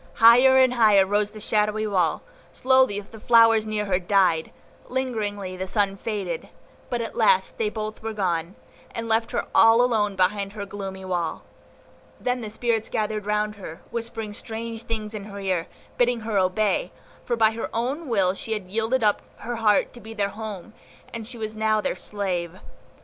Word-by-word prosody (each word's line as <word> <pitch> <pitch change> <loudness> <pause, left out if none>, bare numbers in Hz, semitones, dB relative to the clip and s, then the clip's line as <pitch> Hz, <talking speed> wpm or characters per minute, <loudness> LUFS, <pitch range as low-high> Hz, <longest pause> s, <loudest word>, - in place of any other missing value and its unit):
Higher 250 +4 +7
and 260 -1 +5
higher 210 -5 +5
rose 205 +1 +1
the 215 0 -11
shadowy 210 0 0
wall, 185 -6 0 0.3
slowly 260 -6 +3
the 220 +2 -14
flowers 225 -1 +5
near 210 -1 -1
her 185 -2 +1
died, 180 -4 +2 0.4
lingeringly 210 -7 -3
the 190 +1 -4
sunlight 195 -1 0
faded; 195 -7 -4 0.4
but 240 -1 -1
at 225 - -6
last 475 -1 +2
they 440 -2 +1
both 215 - -5
were 225 0 -4
gone, 180 -4 -2 0.4
and 230 0 -4
left 225 0 +1
her - - -2
all 225 0 +6
alone 220 -5 +2
behind 195 +2 +1
the 205 -2 -5
gloomy 195 -1 -7
wall. 175 -3 -2 0.8
Then 250 0 -1
the 220 - -5
spirits 225 0 -1
gathered 215 -1 -2
round 210 0 0
her, 165 -5 -9
whispering 225 -2 -4
strange 225 +1 -6
things 215 -1 -4
in 205 -2 -6
her 200 -1 -8
ear, 185 -4 -1 0.3
bidding 245 -1 +2
her 215 -2 0
obey, 185 0 +1 0.3
for 240 - -1
by 220 -1 +4
her 225 0 -4
own 265 +8 -2
will 195 -5 +2
she 220 +3 -4
had 190 -4 -6
yielded 225 +3 0
up 210 -1 +3 0.2
her 240 0 -4
heart 215 -2 +2
to 240 - -12
be 220 +1 -10
their 200 -2 0
home, 215 -1 -7 0.4
and 225 -2 -6
she 245 0 -8
was 215 -1 -5
now 215 0 +2
their - - -1
slave. 185 -3 -3
215 Hz, 180 wpm, -24 LUFS, 200-230 Hz, 0.8 s, Higher